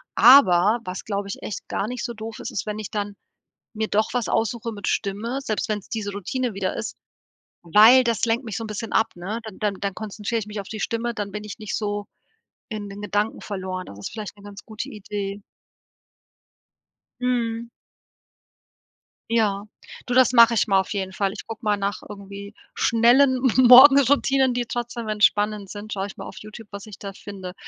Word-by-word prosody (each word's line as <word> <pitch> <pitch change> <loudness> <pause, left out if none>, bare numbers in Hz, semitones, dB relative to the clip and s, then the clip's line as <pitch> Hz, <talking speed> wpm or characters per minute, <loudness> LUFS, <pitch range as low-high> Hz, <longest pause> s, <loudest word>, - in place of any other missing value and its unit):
Aber, 225 -3 +7
was, 185 +1 -5
glaube 200 -1 -3
ich, - - -6
echt 210 - -6
gar 205 - -2
nicht 250 0 -4
so 235 - -4
doof 220 0 -8
ist, - - -6
ist, - - -3
wenn 210 0 -4
ich 215 - -6
dann 205 -1 -3 0.6
mir 220 0 -1
doch 215 +1 +1
was 245 -3 -1
aussuchen 230 0 -1
mit 205 - -6
Stimme, 220 +7 -2
selbst 220 -2 -2
wenn's 210 -2 -3
diese 210 -3 -3
Routine 230 +4 -3
wieder 190 -1 -2
ist, - - -5 0.7
weil 220 +9 +7
das 235 -1 0
lenkt 230 +3 0
mich 220 - -4
so 225 - -4
'n - - -5
bisschen 215 +1 -5
ab, 220 - +2
ne? 200 +6 -5
Dann 220 -3 -10
dann 205 -2 0
dann 200 -1 -2
konzentriere 215 +2 -3
ich 210 - -7
mich 210 0 -6
auf 195 - -7
die 215 - -6
Stimme, 235 +1 -2
dann 205 -2 -4
bin 210 +1 -6
ich 210 +2 -8
nicht 215 -2 -3
so 205 -1 -3 0.6
in 210 -2 -5
den 200 +1 -9
Gedanken 210 +1 -1
verloren. 185 -2 -5
Das 100 - -11
ist - - -6
vielleicht 210 -1 -7
'ne 200 - -17
ganz 205 0 -11
gute 235 +5 -6
Idee. 205 -1 -5 1.8
Mhm. 235 -2 -1 1.6
Ja. 210 -3 +1 0.4
Du, 245 - -1
das 255 -1 +5
mache 235 -1 +7
ich - - +3
mal 195 -1 +4
auf 190 - -3
jeden 190 -2 -3
Fall. 195 -1 0
Ich 215 - -9
gucke 225 +1 -8
mal 210 -1 +1
nach 200 0 -2
irgendwie 200 0 -9 0.2
schnellen 255 +3 +4 0.2
Morgenroutinen, 265 +1 +7
die 245 -1 -1
trotzdem 235 0 -4
entspannend 210 -1 +1
sind, 210 +1 -7
schaue 195 0 -2
ich - - -12
mal - - -7
auf - - -10
YouTube, 215 +1 -11
was 200 +1 -8
ich 205 - -10
da 200 -1 -7
finde. 190 -3 -8
215 Hz, 195 wpm, -23 LUFS, 200-230 Hz, 1.8 s, Aber